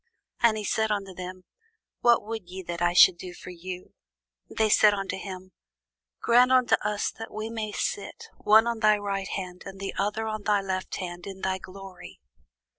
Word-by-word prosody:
And 225 Hz, -2 st, +4 dB
he 215 Hz, -, -4 dB
said 220 Hz, +1 st, 0 dB
unto 195 Hz, -2 st, -2 dB
them, 185 Hz, 0 st, -8 dB, 0.6 s
What 240 Hz, -2 st, +4 dB
would 220 Hz, -5 st, -6 dB
ye 190 Hz, +1 st, -7 dB
that 170 Hz, 0 st, -5 dB
I 175 Hz, 0 st, +3 dB
should 175 Hz, 0 st, +7 dB
do 180 Hz, -1 st, -8 dB
for 180 Hz, -, -10 dB
you? 180 Hz, +1 st, -8 dB, 0.6 s
They 220 Hz, -, +1 dB
said 210 Hz, 0 st, +5 dB
unto 195 Hz, -1 st, -3 dB
him, 185 Hz, -1 st, -8 dB, 0.7 s
Grant 245 Hz, +2 st, +5 dB
unto 255 Hz, -2 st, +4 dB
us 210 Hz, 0 st, -1 dB
that 225 Hz, -, -7 dB
we 215 Hz, +1 st, -5 dB
may 220 Hz, -2 st, -3 dB
sit, 200 Hz, -, -4 dB
one 220 Hz, +2 st, +6 dB
on 235 Hz, -1 st, -2 dB
thy 215 Hz, -1 st, +4 dB
right 200 Hz, -1 st, -3 dB
hand, 180 Hz, -2 st, -5 dB
and 195 Hz, 0 st, -9 dB
the 195 Hz, 0 st, -4 dB
other 210 Hz, +2 st, -1 dB
on 215 Hz, -1 st, -3 dB
thy 205 Hz, 0 st, +2 dB
left 190 Hz, -1 st, -3 dB
hand, 175 Hz, -1 st, -6 dB
in 190 Hz, -1 st, -8 dB
thy 190 Hz, 0 st, -1 dB
glory. 190 Hz, -1 st, -11 dB
195 Hz, 190 wpm, -27 LUFS, 185-215 Hz, 0.7 s, should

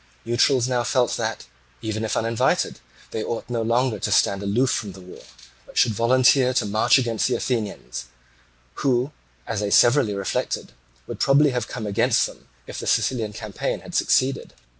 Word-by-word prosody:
Neutrals 120 Hz, +2 st, +2 dB
now 125 Hz, -2 st, 0 dB
felt 125 Hz, 0 st, +1 dB
that -, -, -3 dB, 0.4 s
even 110 Hz, 0 st, -3 dB
if 110 Hz, -, -1 dB
uninvited 115 Hz, 0 st, 0 dB, 0.3 s
they 110 Hz, -, -3 dB
ought 115 Hz, -, -4 dB
no 115 Hz, -1 st, -1 dB
longer 115 Hz, 0 st, +1 dB
to -, -, -2 dB
stand 100 Hz, 0 st, +2 dB
aloof 110 Hz, +6 st, +1 dB
from 100 Hz, -3 st, -3 dB
the 95 Hz, -, -12 dB
war, 90 Hz, 0 st, -12 dB, 0.5 s
but -, -, -13 dB
should 115 Hz, -, +4 dB
volunteer 125 Hz, +3 st, +3 dB
to -, -, +2 dB
march 110 Hz, +5 st, +3 dB
against 115 Hz, -4 st, 0 dB
the 125 Hz, -, 0 dB
Athenians, 105 Hz, -, -3 dB, 0.8 s
who, 130 Hz, +1 st, +1 dB, 0.3 s
as -, -, -3 dB
they 105 Hz, -1 st, -1 dB
severally 120 Hz, -1 st, +4 dB
reflected, 100 Hz, -9 st, -3 dB, 0.3 s
would -, -, -7 dB
probably 140 Hz, +1 st, +4 dB
have 125 Hz, -2 st, -2 dB
come 110 Hz, -, -6 dB
against 115 Hz, +4 st, +2 dB
them -, -, -11 dB, 0.2 s
if -, -, -7 dB
the -, -, -6 dB
Sicilian 115 Hz, -5 st, +1 dB
campaign 105 Hz, -1 st, -4 dB
had -, -, -12 dB
succeeded. 135 Hz, +1 st, +1 dB
115 Hz, 170 wpm, -23 LUFS, 105-125 Hz, 0.8 s, should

